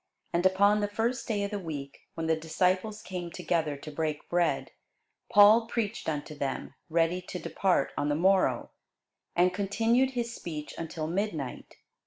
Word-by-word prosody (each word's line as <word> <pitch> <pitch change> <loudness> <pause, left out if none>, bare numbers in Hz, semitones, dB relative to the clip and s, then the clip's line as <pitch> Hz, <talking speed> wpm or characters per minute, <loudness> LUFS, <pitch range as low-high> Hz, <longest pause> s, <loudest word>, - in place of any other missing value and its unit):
And 170 +1 +2
upon 200 +3 +4
the 205 - 0
first 225 +5 -1
day 210 -4 0
of 200 - -3
the 205 - -2
week, 145 -6 -7
when 165 - -3
the 160 0 +3
disciples 185 +6 0
came 180 -2 -5
together 160 -4 -1
to 155 +2 -9
break 155 0 -3
bread, 175 -1 +1 0.6
Paul 215 +2 +7
preached 225 -7 -2
unto 150 0 -3
them, 140 -2 -4 0.2
ready 165 +2 +2
to 180 0 -6
depart 185 +1 0
on 145 - 0
the 145 - +2
morrow; 190 +4 +2 0.6
and 180 +1 +4
continued 230 +7 +2
his 235 -1 -1
speech 155 -8 -6
until 165 -1 -4
midnight. 165 -6 -3
180 Hz, 160 wpm, -29 LUFS, 160-205 Hz, 0.6 s, Paul